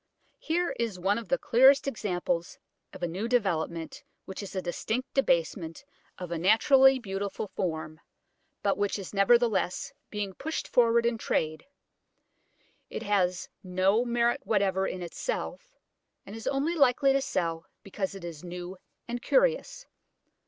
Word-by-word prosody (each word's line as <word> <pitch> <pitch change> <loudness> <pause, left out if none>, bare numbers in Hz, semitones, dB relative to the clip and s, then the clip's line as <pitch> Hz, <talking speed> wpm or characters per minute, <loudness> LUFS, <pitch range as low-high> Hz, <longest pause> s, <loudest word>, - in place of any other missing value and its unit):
Here 340 0 0
is 230 -5 -1
one 200 +5 +1
of 230 - -9
the 270 - +3
clearest 265 +4 +5
examples 180 -8 -2 0.3
of 180 - -10
a - - +2
new 190 +7 -3
development 170 -8 -1 0.2
which 190 - -7
is 200 -1 -8
a - - 0
distinct 220 +8 -3
debasement 170 - 0 0.3
of 180 -2 -7
a 170 - -2
naturally 265 - +5
beautiful 200 -2 -4
form, 160 -3 -4 0.6
but 200 -1 +1
which 205 0 0
is 195 -1 -8
nevertheless 235 +4 +2 0.2
being 205 -2 -4
pushed 320 - -4
forward 235 -1 +3
in 235 -1 0
trade: 155 - -1 1.2
it - - -5
has 185 -4 +1
no 190 +4 +2
merit 240 +2 +1
whatever 195 -3 +1
in 180 - -5
itself, - - -5 0.5
and 200 - -9
is 225 - -7
only 280 +5 0
likely 275 -2 +4
to 275 - +2
sell 165 -9 -2 0.2
because 195 0 -4
it 195 - -9
is 170 -2 -7
new 180 +1 -7 0.3
and 240 0 -4
curious. - - +1
205 Hz, 145 wpm, -28 LUFS, 180-245 Hz, 1.2 s, clearest